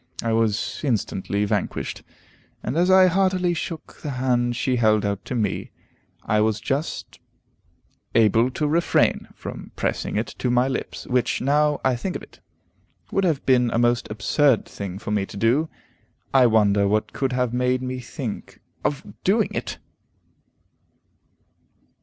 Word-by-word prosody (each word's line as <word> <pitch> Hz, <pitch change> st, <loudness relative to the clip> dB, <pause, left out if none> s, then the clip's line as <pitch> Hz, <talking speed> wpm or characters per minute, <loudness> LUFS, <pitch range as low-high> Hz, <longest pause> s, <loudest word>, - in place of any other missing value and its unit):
I 115 Hz, -1 st, 0 dB
was 115 Hz, -1 st, 0 dB
instantly 105 Hz, -5 st, -1 dB
vanquished, 105 Hz, -2 st, -2 dB, 0.6 s
and 125 Hz, -, -2 dB
as 175 Hz, +3 st, +3 dB
I 190 Hz, 0 st, +7 dB
heartily 185 Hz, -1 st, +2 dB
shook 165 Hz, -1 st, -6 dB
the 150 Hz, -, -4 dB
hand 120 Hz, -1 st, +1 dB
she 125 Hz, +1 st, 0 dB
held 110 Hz, -3 st, +3 dB
out 100 Hz, -1 st, -2 dB
to 125 Hz, -, -4 dB
me, 105 Hz, -5 st, -1 dB, 0.5 s
I 105 Hz, 0 st, +2 dB
was 110 Hz, 0 st, +1 dB
just 135 Hz, +8 st, -3 dB, 1.0 s
able 115 Hz, +2 st, +4 dB
to 150 Hz, +3 st, -1 dB
refrain 170 Hz, +3 st, +2 dB
from -, -, -8 dB
pressing -, -, -2 dB
it -, -, +1 dB
to 125 Hz, -, 0 dB
my 125 Hz, +1 st, +3 dB
lips, 130 Hz, -, -4 dB
which, 125 Hz, -2 st, 0 dB
now 150 Hz, +2 st, +2 dB
I 130 Hz, -1 st, +3 dB
think 175 Hz, +10 st, -4 dB
of -, -, -5 dB
it, -, -, -16 dB, 0.7 s
would 195 Hz, -, +1 dB
have 160 Hz, -6 st, 0 dB
been 125 Hz, -2 st, +4 dB
a 115 Hz, -, -1 dB
most 120 Hz, 0 st, +2 dB
absurd 110 Hz, +4 st, +2 dB
thing 95 Hz, -2 st, -6 dB
for 105 Hz, -, -6 dB
me 105 Hz, -2 st, +1 dB
to -, -, -9 dB
do. 125 Hz, +10 st, +2 dB, 0.6 s
I 130 Hz, -2 st, +6 dB
wonder 105 Hz, -3 st, +3 dB
what 105 Hz, +1 st, 0 dB
could 135 Hz, -2 st, -1 dB
have 125 Hz, -2 st, 0 dB
made 125 Hz, +1 st, +1 dB
me 130 Hz, 0 st, -3 dB
think 120 Hz, -2 st, -6 dB, 0.2 s
of 145 Hz, -, -1 dB, 0.2 s
doing 210 Hz, +3 st, +3 dB
it! -, -, -4 dB
125 Hz, 155 wpm, -23 LUFS, 110-145 Hz, 1.0 s, I